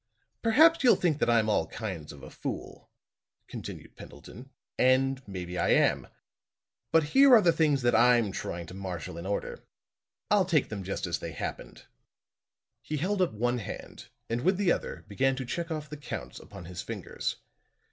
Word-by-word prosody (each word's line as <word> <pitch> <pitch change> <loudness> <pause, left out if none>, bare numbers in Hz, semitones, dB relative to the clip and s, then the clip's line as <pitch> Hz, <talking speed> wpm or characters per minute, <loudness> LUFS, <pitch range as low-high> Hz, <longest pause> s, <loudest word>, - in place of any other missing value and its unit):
"Perhaps 315 +8 +5
you'll 250 - +7
think 160 -5 0
that - - +1
I'm 115 -2 +3
all 105 - +1
kinds 95 -9 -6
of 70 -3 -13
a - - -10
fool," - - -7 0.6
continued - - -9
Pendleton, 125 +6 -12 0.3
"and 130 +1 +3
maybe 90 -2 -5
I - - +1
am. - - +3 0.8
But 165 -1 +5
here 265 - +6
are 220 - +7
the 170 - +5
things 150 -5 +2
that 120 - +3
I'm 120 -2 +4
trying 85 -2 -5
to 85 - -11
marshall 90 -4 -6
in 85 - -6
order. 100 - -4 0.7
I'll - - +4
take - - +1
them 105 -2 -5
just 95 +1 -3
as 85 -2 -2
they 85 -2 -6
happened." - - -7 1.0
He 155 - -4
held 190 +6 0
up 180 - +1
one 120 +3 0
hand 105 - -8 0.2
and 115 +1 -2
with 185 +5 +2
the 195 -3 +2
other - - -3
began 135 +6 +1
to 130 0 -5
check 170 +7 -4
off 155 -2 -4
the 150 +1 -8
counts 115 - -7
upon 95 -4 -11
his 90 +1 -6
fingers. - - -4
120 Hz, 175 wpm, -29 LUFS, 95-160 Hz, 1.0 s, you'll